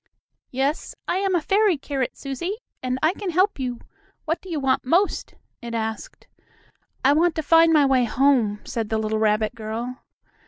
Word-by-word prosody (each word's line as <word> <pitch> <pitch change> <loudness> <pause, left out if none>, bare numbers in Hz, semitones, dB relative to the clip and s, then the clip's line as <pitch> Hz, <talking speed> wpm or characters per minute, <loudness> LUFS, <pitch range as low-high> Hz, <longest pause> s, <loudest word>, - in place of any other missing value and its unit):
"Yes, 270 +4 -2
I 360 - 0
am 385 -1 +1
a 345 - +2
fairy 400 0 +2
carrot, 275 -2 -3
Susie, 285 +8 -4 0.3
and 255 0 -1
I 320 +3 +4
can 400 -1 -5
help 370 +1 +1
you. 250 -2 -3 0.5
What 325 +1 -1
do 380 - -12
you 320 -3 -2
want 270 -1 +1
most?" 350 +10 +1 0.3
it 235 -1 -5
asked. 220 -1 -5 0.8
"I 275 - +6
want 330 +2 +2
to 315 - -2
find 330 +2 +5
my 300 -3 +5
way 260 -2 +3
home," 235 -5 +2
said 225 -2 -4
the 220 - 0
little 220 0 -1
rabbit 215 +1 +1
girl. 230 +3 -5
270 Hz, 180 wpm, -23 LUFS, 235-330 Hz, 0.8 s, I